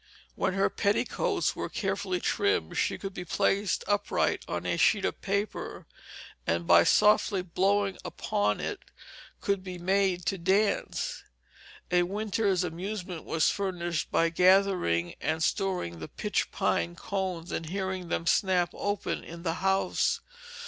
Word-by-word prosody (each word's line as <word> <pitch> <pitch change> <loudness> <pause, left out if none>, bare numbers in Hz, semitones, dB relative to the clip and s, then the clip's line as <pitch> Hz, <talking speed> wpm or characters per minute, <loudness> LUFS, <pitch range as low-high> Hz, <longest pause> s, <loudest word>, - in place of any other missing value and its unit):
When 190 - 0
her 195 - +2
petticoats 395 - 0
were - - -4
carefully 195 -2 -2
trimmed, 85 - 0
she - - 0
could 195 -1 -6
be 180 - -5
placed 195 +1 +1
upright 205 0 +1
on - - -3
a - - 0
sheet - - +3
of - - -3
paper, 200 +1 -3 0.6
and 85 +1 0
by 85 0 +6
softly 210 -2 +4
blowing 195 +2 +1
upon 105 - -1
it - - -3 0.6
could 200 -2 0
be 185 -1 -6
made 185 0 +1
to 190 +1 -1
dance. 195 +4 0 0.7
A 180 0 +4
winter's 200 0 0
amusement 180 0 -5
was 160 -1 +2
furnished 175 -5 -2
by 165 - +2
gathering 180 - +3
and 160 +1 0
storing 180 - -1
the 80 - -6
pitch - - -2
pine 85 +1 0
cones 185 -4 -3
and 165 - -3
hearing 190 0 -3
them 165 - -2
snap 180 +1 +2
open 205 0 -2
in 170 0 -9
the 165 -3 0
house. 195 0 +1
185 Hz, 140 wpm, -29 LUFS, 170-195 Hz, 0.7 s, by